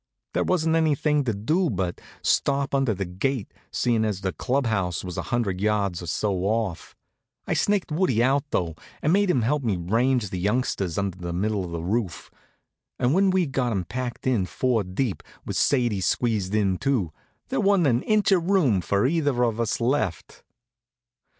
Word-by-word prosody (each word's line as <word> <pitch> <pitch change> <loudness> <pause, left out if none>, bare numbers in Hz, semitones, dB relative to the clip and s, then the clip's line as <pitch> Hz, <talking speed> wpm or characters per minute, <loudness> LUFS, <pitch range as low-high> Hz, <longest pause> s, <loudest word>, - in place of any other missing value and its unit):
There - - +1
wasn't 165 -3 +1
anything 150 -2 +2
to 120 - +1
do 155 - +1
then 140 - -1
but 90 -1 -2 0.2
stop 140 -1 +1
under 135 -6 +2
the 95 +1 -3
gate, 100 +6 -2 0.2
seein' 115 -2 +1
as 105 -3 -2
the 95 -2 -2
club 135 +1 0
house 95 -6 -1
was 90 -2 -6
a - - -2
hundred 100 -6 -1
yards 100 -4 0
or 85 - -7
so 95 +5 0
off. 100 -1 -2 0.5
I - - -1
snaked 200 -5 +1
Woodie 150 - +2
out, 135 +2 +2
though, 85 -9 -1 0.3
and 155 - +3
made 200 0 +3
him 130 -10 +2
help 145 +6 +1
me 110 -7 0
range 115 +5 +1
the 90 - -3
youngsters 100 -4 -1
under 100 -2 -2
the 85 -1 -4
middle 100 +2 -1
of 90 - -6
the 85 -1 -4
roof; 100 -1 -2 0.7
and 125 +3 +2
when 195 +2 +4
we'd 185 -6 +1
got 125 -2 0
'em 95 -5 -1
packed 125 +4 -5
in 115 -8 +1
four 125 -2 0
deep, 95 +4 -2 0.2
with - - -4
Sadie 120 -8 +2
squeezed 105 0 0
in 95 -4 +1
too, 120 - 0 0.4
there - - 0
wa'n't 195 -3 +3
an 125 -3 +3
inch 215 +1 +2
of 180 -2 +2
room 140 - +3
for 100 +4 +1
either 145 -4 +1
of 115 -2 0
us 115 -2 0
left. 120 - -1
115 Hz, 190 wpm, -25 LUFS, 95-140 Hz, 0.7 s, when